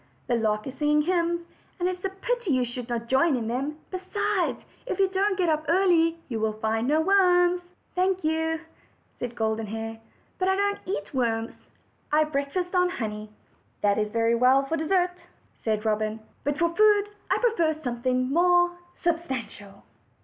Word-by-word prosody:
The 245 - -1
lark 215 -2 0
is 265 - -5
sing 295 -1 +1
ing 300 0 +4
hymns, 345 0 +1 0.4
and 355 - +1
it 365 0 -2
is 360 - -7
a - - +1
pity 470 +3 -3
you 255 -2 +2
should 245 0 -7
not 235 -1 -2
join 270 +4 +3
in 225 -2 -3
them; 270 +6 -2
besides, 380 0 -1 0.2
if - - -2
you 390 -1 +4
don't 385 +1 0
get 365 -2 +1
up 310 -1 +1
early 335 -2 +3
you 230 -4 -3
will 220 0 0
find 220 +2 -1
no 305 +3 +3
worms." 360 -1 +4 0.3
"Thank 370 0 +1
you," 320 +1 0 0.6
said 245 -1 -4
Goluen 220 -1 -1
Hair, 225 +1 -5 0.4
"but 370 - +1
I 380 - +3
don't 405 +1 0
eat 200 +4 -4
worms; 230 -3 0 0.6
I 305 +1 +5
breakfast 305 +5 -2
on 360 -1 +3
honey." 215 - -4 0.5
"That's 210 +1 +2
very 230 +1 +2
well 255 +3 +4
for 320 - -1
dessert," 355 +3 +1 0.5
said 215 -1 -1
Robin; 215 0 0 0.2
"but 290 0 -1
for 340 +1 +2
food 415 0 +4 0.2
I - - +3
prefer 340 -10 +2
something 255 +1 0
more 350 +1 +4 0.3
substantial." 265 - -3
305 Hz, 170 wpm, -26 LUFS, 230-360 Hz, 0.6 s, I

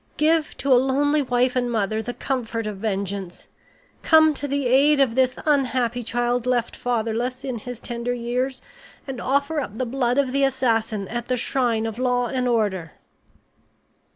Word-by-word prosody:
Give 315 +1 +1
to 275 -1 +2
a 245 - +6
lonely 290 +3 +2
wife 250 0 +1
and 245 -1 0
mother 215 -1 0
the 245 +2 -6
comfort 230 -4 -3
of 210 -2 -4
vengeance! 195 -3 -4 0.5
Come 315 -1 +5
to 290 0 -4
the 280 -1 -1
aid 280 +4 +4
of 265 -4 +3
this 255 0 +2
unhappy 255 -5 +1
child 240 +1 -1
left 240 -2 0
fatherless 240 +1 -2
in 255 -4 -4
his 245 +1 -7
tender 240 0 -4
years, 250 +2 -2 0.4
and 265 -3 -6
offer 280 +4 0
up 220 -6 -5
the 255 - -1
blood 245 0 0
of 275 -2 +2
the 275 +1 +1
assassin 225 -6 0
at 240 0 -4
the 255 - 0
shrine 235 -3 0
of 225 +1 -5
law 250 -1 +1
and 255 -1 -1
order." 205 -9 0
245 Hz, 170 wpm, -23 LUFS, 230-265 Hz, 0.5 s, a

